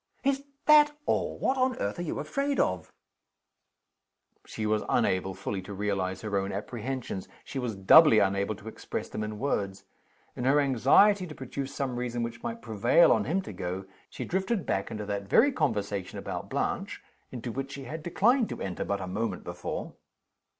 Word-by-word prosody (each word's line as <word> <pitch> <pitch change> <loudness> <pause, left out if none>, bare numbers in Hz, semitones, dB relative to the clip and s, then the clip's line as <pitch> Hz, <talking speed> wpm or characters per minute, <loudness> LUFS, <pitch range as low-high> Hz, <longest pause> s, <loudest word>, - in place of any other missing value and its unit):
"Is 275 0 +1 0.2
that 295 -1 +6
all? - - 0
What 265 0 0
on 255 0 +2
earth - - -2
are - - -1
you 175 - -3
afraid 275 - -1
of?" 90 -2 0 1.6
She 110 - -4
was 105 0 +1
unable 95 -5 +1
fully 100 -2 -4
to 100 +2 -8
realize 95 -2 -1
her 105 -2 -3
own 95 +1 -3
apprehensions. 115 0 -4 0.2
She 135 - -5
was 120 -4 -3
doubly 110 +8 +7
unable 100 +1 +2
to 105 - -13
express 110 - -5
them 105 - -4
in 105 0 -5
words. 100 -7 -2 0.5
In 125 - -4
her 140 +3 +5
anxiety 180 - +4
to 155 - -9
produce 135 +1 -5
some 130 -3 -2
reason 120 -1 -2
which 115 0 -5
might 235 -1 -5
prevail 115 +9 +4
on 110 -2 +3
him 185 +7 0
to 105 - -8
go, 90 +1 -4 0.2
she - - -6
drifted 190 +2 -1
back 95 - -1
into 105 -1 -5
that 100 -1 -3
very 280 - +5
conversation 100 - -2
about - - -5
Blanche - - -2 0.3
into 120 -1 -5
which 135 +3 -4
she 140 - -7
had 155 +5 -6
declined 220 - +2
to - - -5
enter 95 -2 -3
but 100 - -1
the 95 - -5
moment 100 +1 -3
before. - - -5
120 Hz, 180 wpm, -28 LUFS, 100-160 Hz, 1.6 s, doubly